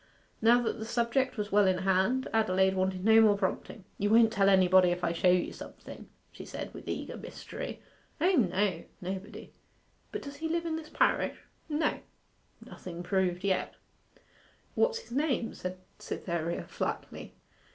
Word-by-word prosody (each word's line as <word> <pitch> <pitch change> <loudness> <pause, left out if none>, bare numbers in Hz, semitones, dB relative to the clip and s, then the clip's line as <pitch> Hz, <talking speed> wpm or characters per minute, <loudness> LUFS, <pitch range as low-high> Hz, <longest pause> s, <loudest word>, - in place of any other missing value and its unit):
Now 235 +2 +6
that 225 - -2
the 220 - -4
subject 235 +3 0
was 210 0 -3
well 205 -1 +5
in 185 -1 +2
hand, 190 +8 +2
Adelaide 190 -3 +3
wanted 185 0 -1
no 225 0 +7
more 210 -2 +5
prompting. 195 +1 -3 0.2
'You 205 - +1
won't 225 0 +5
tell 195 -1 +4
anybody 185 -1 +5
if 175 0 -2
I 170 - +1
show 180 +2 +3
you 180 0 +2
something?' - - -11 0.2
she - - -10
said, - - -7
with - - -10
eager - - -4
mystery. - - -8 0.4
'O 355 +5 +3
no, 195 - +1 0.2
nobody. 195 +3 -7 0.6
But 420 - -5
does 280 0 -8
he 320 +2 -3
live 335 +1 -1
in 325 -1 -1
this 315 -1 -7
parish?' - - +1 0.3
'No.' 300 0 0 0.7
Nothing 175 -1 -8
proved 180 -1 0
yet. 195 -2 0 1.0
'What's 470 -1 +2
his 465 - -12
name?' 265 -3 0
said 185 0 -6 0.2
Cytherea 170 -1 -3
flatly. - - -5
205 Hz, 160 wpm, -30 LUFS, 185-245 Hz, 1.0 s, no